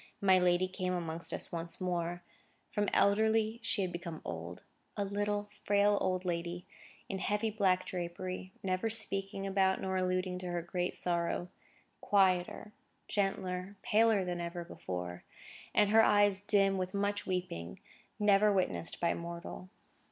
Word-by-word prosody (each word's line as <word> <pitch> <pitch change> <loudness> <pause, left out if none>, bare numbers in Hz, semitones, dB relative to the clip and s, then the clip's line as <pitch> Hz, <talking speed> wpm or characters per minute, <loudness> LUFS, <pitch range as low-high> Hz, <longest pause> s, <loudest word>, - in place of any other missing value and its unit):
My 190 -2 +5
lady 180 +1 +3
came 185 -1 -2
amongst 170 -1 -4
us - - -3
once 170 0 -4
more. 175 -1 -2 0.5
From 205 -1 +1
elderly 220 +2 +3
she 210 -3 0
had 185 - -2
become 170 -2 -6
old; 85 +1 -6 0.3
a 205 - 0
little, 205 +1 -1
frail, 205 0 +3
old 185 0 0
lady, 175 0 -2 0.4
in 190 - -3
heavy 210 +3 0
black 190 -3 +2
drapery, 185 +1 -5
never 185 +3 0
speaking 195 -3 -2
about 190 -1 +2
nor 190 0 -1
alluding 185 0 0
to 180 - -6
her 175 -1 -2
great 180 +1 -2
sorrow; 175 0 -1 0.5
quieter, 190 +1 +2 0.3
gentler, 195 -1 -1
paler 220 -3 +4
than 175 -1 -2
ever 170 0 -4
before; 90 - -6 0.5
and 210 -1 +3
her 225 +1 +7
eyes 205 -2 +4
dim 195 -2 +3
with 185 +1 -3
much 205 +1 0
weeping, 180 - -3 0.4
never 210 0 +5
witnessed 135 - 0
by 170 - +2
mortal. 170 +2 -7
185 Hz, 145 wpm, -33 LUFS, 175-205 Hz, 0.5 s, her